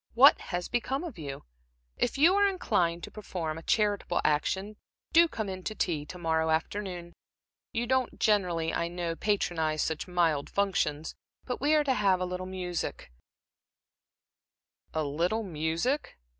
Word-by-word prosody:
What 270 +5 +8
has 175 -1 -2
become 265 +5 -1
of 330 - -7
you? 140 -3 -6 0.5
If 245 - 0
you 325 +6 +6
are 405 0 +4
inclined 175 - 0
to - - -7
perform 165 -7 -4
a - - -11
charitable 205 -2 +1
action, 190 +8 0 0.4
do 335 +1 +7
come 220 -9 -4
in 185 -1 -5
to 215 - -3
tea 155 -7 -1
to 180 - -8
morrow 160 -2 +1
afternoon. 175 +1 -2 0.6
You 235 +1 -1
don't 260 0 0
generally, 180 -7 +2
I 170 - 0
know, 170 -1 -3
patronize 165 -6 0
such 160 -1 -2
mild 165 -5 +1
functions, 175 -6 0 0.3
but 250 -1 -4
we 295 +2 +4
are 300 - +4
to 275 -2 +2
have 195 -5 +3
a 185 - 0
little 180 0 -4
music" 180 - -4 1.8
"A 155 - -1
little 170 +10 0
music?" 165 - -1
180 Hz, 155 wpm, -29 LUFS, 165-220 Hz, 1.8 s, What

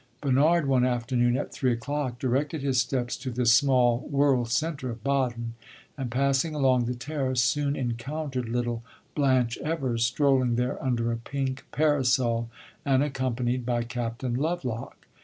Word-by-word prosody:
Bernard, 150 +4 +3
one 130 -2 +3
afternoon, 120 0 +1
at - - -4
three 130 -2 +1
o'clock, 130 +1 -3
directed 135 +4 -1
his 130 -3 +2
steps 125 -2 -2
to 130 +1 -5
this 120 -1 +3
small 125 -2 +4
world 140 -4 +2
centre 140 +1 -1
of 115 -2 -7
Baden, 120 -4 -1 0.4
and, 135 -4 -4
passing 140 +5 +1
along 130 -4 +3
the 125 +1 -2
terrace, 130 -2 -1
soon 145 +3 +1
encountered 130 +1 -3
little 120 -1 -1 0.3
Blanche 130 -5 +2
Evers 135 -8 -1
strolling 130 0 +2
there 125 +1 -2
under 120 -3 0
a 115 - -1
pink 135 +2 -4
parasol 130 -6 +2 0.3
and 135 0 +3
accompanied 125 -3 -1
by 120 -1 0
Captain 120 +1 -3
Lovelock. 130 -4 -3
130 Hz, 145 wpm, -27 LUFS, 120-140 Hz, 0.4 s, small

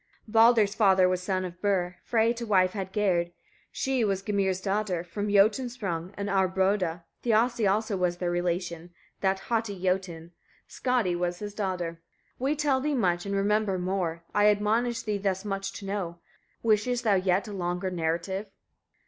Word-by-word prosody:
30. 215 - -14
Baldr's 225 -2 +5
father 190 -4 +4
was 185 0 0
son 185 0 -1
of 180 0 -9
Bur: 180 -3 0
Frey 230 0 +2
to 240 0 -6
wife 185 -3 +4
had 190 -2 -5
Gerd, 185 -5 +1 0.4
she 265 -3 0
was 195 -2 0
Gymir's 195 -2 0
daughter, 195 -3 -1
from 205 +4 -4
Jotuns 215 +5 +3
sprung 180 -7 -4
and 200 0 -3
Aurboda; 190 -3 +1 0.2
Thiassi 230 -2 +2
also 215 0 0
was 180 -2 0
their 175 -1 -1
relation, 175 -1 -2 0.3
that 190 0 0
haughty 225 -4 -2
Jotun; 180 -3 -2 0.4
Skadi 240 -9 0
was 175 0 -1
his 205 +1 -6
daughter. 180 -5 -3 0.4
31. 265 +2 0
We 300 - +1
tell 285 -3 +1
thee 295 +1 0
much, 180 -5 0
and 200 - -1
remember 205 0 +1
more: 180 -2 -2
I 205 0 +4
admonish 220 +3 +1
thee 210 -2 -2
thus 190 0 -1
much 195 -1 -3
to 200 - -8
know. 190 -4 -3 0.5
Wishest 230 +2 +2
thou 215 -3 +3
yet 185 +1 +1
a 210 - -6
longer 180 0 -2
narrative? 170 +4 -2
195 Hz, 170 wpm, -27 LUFS, 180-215 Hz, 0.5 s, Baldr's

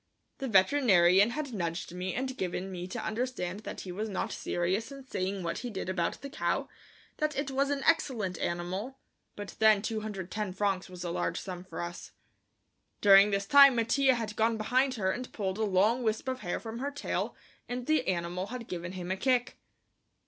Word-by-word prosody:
The 270 - -3
veterinarian 195 -3 +5
had 280 +1 -4
nudged 170 -3 -3
me 180 +1 -3
and 260 +1 -2
given 185 -1 -3
me 180 -1 -5
to 185 - -5
understand 215 -5 -2
that 215 - -7
he 185 - -7
was 215 +4 -3
not 190 - -2
serious 190 +8 -1
in 275 -1 -10
saying 190 -5 -3
what 170 0 -2
he 245 - -5
did 190 -4 -5
about 175 -3 -1
the 280 - -6
cow, 300 - -1 0.5
that 305 -1 -1
it 280 0 -1
was 275 +1 +1
an 280 -1 -1
excellent 220 - +1
animal, 185 +9 -3 0.4
but 205 -1 -7
then 215 -2 +5
210 210 -3 -3
francs 195 -1 -1
was 180 -1 -8
a 175 - -3
large - - -1
sum 180 -2 -6
for 175 -3 -7
us. 175 +1 -7 0.9
During 200 0 +7
this 200 -1 0
time 275 +3 +8
Mattia 260 +3 +3
had 220 -3 -4
gone 225 +1 +2
behind 255 +4 +1
her 190 -4 0
and 250 +5 -5
pulled 195 -1 -3
a - - +1
long 210 +5 +3
wisp 220 +2 -1
of 260 0 -2
hair 175 -7 -3
from 225 0 -7
her 280 +2 -2
tail 285 0 -3 0.3
and 245 0 -3
the 310 -3 +1
animal 180 +1 -1
had 240 +1 -7
given 175 0 -5
him 180 -1 -5
a 190 - -1
kick. 250 +3 +1
210 Hz, 190 wpm, -30 LUFS, 185-250 Hz, 0.9 s, time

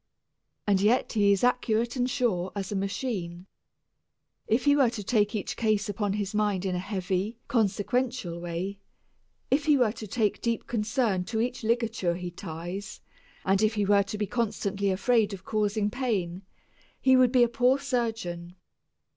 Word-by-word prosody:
And 195 -2 +2
yet 225 +5 +2
he 205 -3 +4
is 200 +1 +1
accurate 240 -1 +1
and 250 0 0
sure 195 -9 0
as 195 -1 -4
a - - -2
machine. 195 -3 -3 1.0
If 230 +5 +1
he 285 0 +5
were 270 -4 +4
to 225 -3 -6
take 210 0 +1
each 210 - -3
case 215 -2 +1
upon 205 0 -1
his 205 -1 -3
mind 205 -3 0
in 185 - 0
a 180 - -1
heavy, 190 +2 -2
consequential 230 -3 0
way, 175 +3 -4 0.7
if 285 +2 +2
he 300 -2 +5
were 245 -5 +3
to 215 -1 -8
give 215 -1 0
deep 230 -1 -1
concern 220 -3 0
to 220 +3 -2
each 245 +1 -2
ligature 225 -6 0
he 180 0 -5
ties, 175 +5 -7 0.5
and 195 +1 +3
if 215 +1 +2
he 205 -1 +1
were 200 0 +5
to 200 +2 -4
be 210 - 0
constantly 200 -3 -1
afraid 210 +2 +2
of 190 - -15
causing 210 -1 0
pain, 200 -9 -2 0.6
he 260 -1 +5
would 255 -2 +5
be 250 -2 +5
a - - +4
poor 250 +3 +3
surgeon. 225 -10 -3
210 Hz, 170 wpm, -27 LUFS, 195-240 Hz, 1.0 s, he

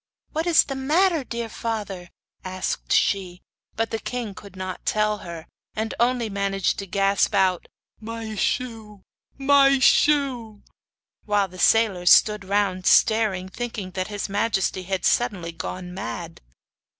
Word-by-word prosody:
'What 320 +3 -2
is 335 -3 +6
the 275 - -5
matter, 315 +4 +2
dear 235 -2 -4
father?' 205 -6 -5 0.3
asked 185 0 -4
she. 185 -3 +1 0.3
But 225 0 -1
the 225 - -2
king 240 -4 -5
could 195 0 -13
not 185 0 -6
tell 215 0 0
her; 170 -4 -8 0.3
and 220 +1 -2
only 240 -1 +1
managed 195 -1 -1
to 200 - -6
gasp 195 +3 +1
out: 185 -3 +2 0.3
'My 225 0 -6
shoe! 220 -2 -3 0.3
my 275 0 +5
shoe!' 260 -6 +2 0.6
While 205 -2 +1
the 185 +1 -12
sailors 195 -5 +3
stood 210 -1 +5
round 190 -1 0
staring, 215 -4 +3
thinking 205 -2 -6
that 185 0 -3
his 205 -1 -4
majesty 200 -2 0
had 190 0 -3
suddenly 195 -9 0
gone 180 +2 -6
mad. 175 -3 -6
205 Hz, 140 wpm, -23 LUFS, 185-230 Hz, 0.6 s, is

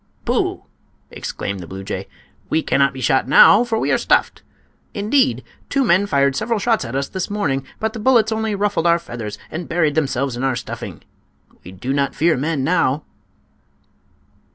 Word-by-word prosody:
"Pooh!" - - -1 0.5
exclaimed 100 -1 -5
the 85 - -8
blue 95 +2 -8
jay, - - -5 0.4
"we 160 - +1
cannot 140 0 +2
be 130 -1 -8
shot 135 -1 +2
now, 200 - +7
for 235 -2 -1
we - - 0
are - - +2
stuffed. - - +1 0.5
Indeed, 240 +7 +1 0.3
two 275 -1 +1
men 200 -3 +3
fired 140 -4 +2
several 225 - -1
shots 225 +2 +1
at 115 - -6
us 140 0 -1
this 190 -2 -4
morning, 135 -11 -1
but 220 0 -2
the 225 - -6
bullets 230 -1 +3
only 220 -1 -1
ruffled 200 -4 0
our 170 0 +5
feathers 120 -10 -7
and 170 +1 -6
buried 165 -3 +1
themselves 140 -4 -1
in 125 - -4
our 135 -1 +1
stuffing. - - -7 0.6
We 90 - -10
do 115 +9 -4
not 140 -1 0
fear 165 +1 +3
men 145 +1 -1
now." 150 -3 +1
160 Hz, 175 wpm, -20 LUFS, 135-210 Hz, 0.6 s, now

